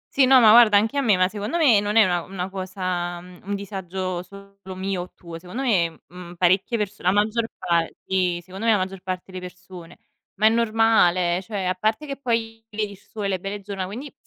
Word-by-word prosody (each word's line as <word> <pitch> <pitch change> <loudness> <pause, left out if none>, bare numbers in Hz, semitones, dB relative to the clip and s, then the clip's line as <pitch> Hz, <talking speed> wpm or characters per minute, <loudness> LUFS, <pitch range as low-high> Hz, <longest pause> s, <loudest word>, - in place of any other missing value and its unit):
Sì, 270 - +5
no, 265 0 +7
ma 220 -3 +7
guarda 225 -2 +7
anche 220 +6 +1
a - - +2
me, 215 -8 +3
ma 185 - +3
secondo 210 - -4
me 265 -11 +5
non 205 +1 -2
è 225 - +7
una 175 -1 0
una 185 +1 -5
cosa 185 -2 -3
mhmm, 180 0 -14
un 200 +1 -2
disagio 190 -2 -4
solo 200 0 -12
mio 190 -1 -3
o 180 - -8
tuo. 170 -1 -10
Secondo 185 +10 -6
me, 175 -10 0
mhmm, 180 0 -11
parecchie 185 +6 +2
perso 210 -1 -4
la 180 - +2
maggior 215 +3 +1
par 170 -1 0 0.2
sì, 180 -2 0
secondo 190 +5 -6
me 225 - +6
la - - +3
maggior 190 0 -4
parte 185 0 -5
delle 185 - -6
persone. 180 -1 -11 0.4
Ma 210 - +1
è - - +8
normale, 215 -6 +2
cioè 200 -1 -5
a 185 0 0
parte 215 +9 -1
che 280 -2 -5
poi 225 -3 -2
vedi 210 -1 -3
il 200 - -12
sole, 210 0 -6
le 190 -1 -1
belle 195 +3 -5
giornà, 195 -2 -5
quindi 255 +9 -8
195 Hz, 225 wpm, -23 LUFS, 180-215 Hz, 0.4 s, è